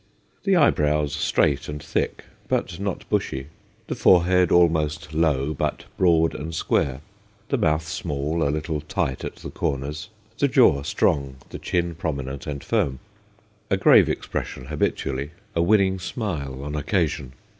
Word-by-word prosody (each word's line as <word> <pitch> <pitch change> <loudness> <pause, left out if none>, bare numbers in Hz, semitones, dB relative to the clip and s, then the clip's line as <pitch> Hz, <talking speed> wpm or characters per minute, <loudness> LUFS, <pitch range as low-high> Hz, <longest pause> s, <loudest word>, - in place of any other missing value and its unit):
The 195 -1 +4
eyebrows 75 - +3
straight 70 -1 +1
and 75 0 -4
thick, - - -2 0.2
but 85 - -1
not 100 -2 -3
bushy; 65 +2 -2 0.4
the - - -3
forehead 90 0 +4
almost 80 -3 +2
low, 75 -2 +1
but - - -2
broad 80 -3 +3
and 80 +4 -5
square; 65 -3 0 0.5
the 140 - +1
mouth 80 -5 +1
small, 80 -1 -2
a 70 - +2
little 75 +1 -2
tight 85 -5 -2
at - - -5
the - - -9
corners; 75 +7 -3 0.3
the 140 - +4
jaw 120 - +5
strong, 70 -1 0 0.2
the - - -6
chin 85 -1 -1
prominent 70 -4 -4
and 70 -2 -4
firm. 90 - 0 0.7
A - - +2
grave - - +6
expression 65 - -4
habitually, 70 0 -2 0.2
a 85 - +2
winning 95 0 +3
smile 75 - -4
on 75 +1 -4
occasion. 75 -4 -1
75 Hz, 145 wpm, -24 LUFS, 70-85 Hz, 0.7 s, grave